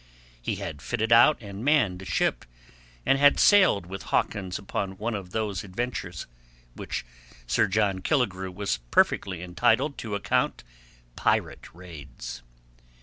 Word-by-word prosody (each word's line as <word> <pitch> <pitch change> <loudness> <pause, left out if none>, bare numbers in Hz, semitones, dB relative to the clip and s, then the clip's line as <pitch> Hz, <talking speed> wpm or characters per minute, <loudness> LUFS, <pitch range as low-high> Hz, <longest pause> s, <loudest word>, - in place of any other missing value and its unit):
He - - -2
had 70 - -6
fitted 115 - -2
out 120 +6 +7
and 100 +1 -8
manned 125 -11 +2
a - - -9
ship, - - 0 0.6
and 135 - +3
had 145 0 +5
sailed 185 - +5
with 95 +1 -7
Hawkins 95 -3 -1
upon 95 -1 -4
one 115 +4 -2
of 95 -4 -5
those 105 -1 -2
ventures, 100 -2 -5 0.5
which - - -5 0.4
Sir - - +2
John 100 -1 +1
Killigrew 95 -7 0
was 100 +2 -2
perfectly 90 +6 +2
entitled 120 +10 +1
to 105 -3 -4
account 100 - 0 0.5
pirate - - 0
raids. 70 -8 -9
100 Hz, 135 wpm, -26 LUFS, 90-115 Hz, 0.6 s, out